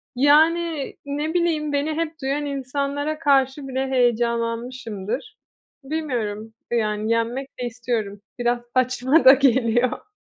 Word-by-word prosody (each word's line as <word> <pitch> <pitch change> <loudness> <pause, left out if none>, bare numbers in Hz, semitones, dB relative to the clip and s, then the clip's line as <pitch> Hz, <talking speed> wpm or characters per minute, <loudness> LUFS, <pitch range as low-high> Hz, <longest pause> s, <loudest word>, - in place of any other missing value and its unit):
yani, 315 +2 +3
ne 295 +3 -3
bileyim, 320 -4 0
beni 290 +2 0
hep 330 0 -2
duyan 280 +2 -1
insanlara 280 +2 -3
karşı 275 -2 +2
bile 265 0 -2
heyecanlanmışımdır. 235 - -1 0.5
Bilmiyorum. 235 -8 -3 0.2
Yani, 215 -1 0
yenmek 240 +4 -1
de 245 - -2
istiyorum 230 -4 -3 0.2
biraz 240 0 +1
saçma 255 +4 +2
da 265 - +11
geliyor. 255 - +2
265 Hz, 110 wpm, -23 LUFS, 235-290 Hz, 0.5 s, da